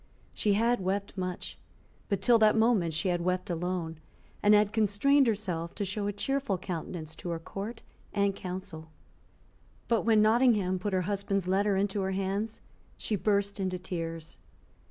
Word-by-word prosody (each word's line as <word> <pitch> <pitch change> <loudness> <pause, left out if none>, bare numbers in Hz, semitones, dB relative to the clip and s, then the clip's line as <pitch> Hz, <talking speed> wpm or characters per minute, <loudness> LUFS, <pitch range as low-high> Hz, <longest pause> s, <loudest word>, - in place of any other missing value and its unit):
She 210 - +1
had 235 +4 +2
wept 200 +2 -2
much; 185 -2 -5 0.5
but 200 -3 -1
till 240 -2 +6
that 215 -1 +5
moment 220 -8 +3
she 155 +5 0
had 175 -1 0
wept 180 +1 -1
alone, 170 -2 -3 0.4
and 210 0 +6
had 210 0 +3
constrained 225 +6 +3
herself 180 -6 -2
to 205 - -2
show 200 +2 -2
a - - 0
cheerful 265 0 -1
countenance 165 -3 -5
to 175 - -6
her 170 - -1
Court 200 +7 -7 0.3
and 200 -1 +1
Council. 180 -4 -7 1.0
But 230 -2 +2
when 220 -1 +4
Nottingham 215 -4 +3
put 200 +2 -3
her 185 - +2
husband's 195 0 -1
letter 195 +1 +2
into 200 +1 0
her 190 0 -1
hands, 195 +3 -2 0.4
she 215 - -1
burst 200 0 0
into 185 -1 -1
tears. 165 -3 -5
195 Hz, 160 wpm, -29 LUFS, 180-210 Hz, 1.0 s, till